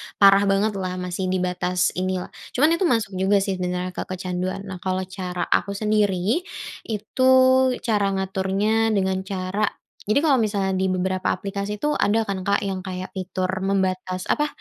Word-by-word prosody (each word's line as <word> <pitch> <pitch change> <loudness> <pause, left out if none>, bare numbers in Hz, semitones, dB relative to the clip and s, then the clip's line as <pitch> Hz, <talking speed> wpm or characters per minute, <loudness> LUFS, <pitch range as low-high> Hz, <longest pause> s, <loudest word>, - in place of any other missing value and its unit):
parah 200 0 +6
bangetlah 195 -2 0
masih 180 +1 -3
di 185 0 0
batas 180 0 0
inilah, 185 -1 -2 0.2
cuman 295 +5 +5
itu 380 - +2
masuk 225 -6 +1
juga 195 +2 +3
sih 195 -2 -2
sebenarnya 180 0 -2 0.2
kecanduan 185 +1 -3
nah 190 -2 -7
kalau 185 +1 -1
cara 180 -1 -4
aku 200 - -1
sendiri, 210 - +1 0.5
itu 220 +3 -4 0.6
cara 210 -3 +1
ngaturnya 195 +4 +1
dengan 190 -1 +1
cara 195 +2 -1 0.4
jadi 215 - +4
kalau 275 -5 +4
misalnya 200 -3 0
di 190 - +1
beberapa 185 0 -1
aplikasi 200 +1 -4
itu 295 - +2
ada 220 +2 +3
kan 195 -2 -3
Kak 200 0 +2
yang 190 -1 -2
kayak 185 -1 -6
fitur 185 -1 -2
membatas 185 -1 -1
apa, 295 0 +2
190 Hz, 155 wpm, -23 LUFS, 185-205 Hz, 0.6 s, parah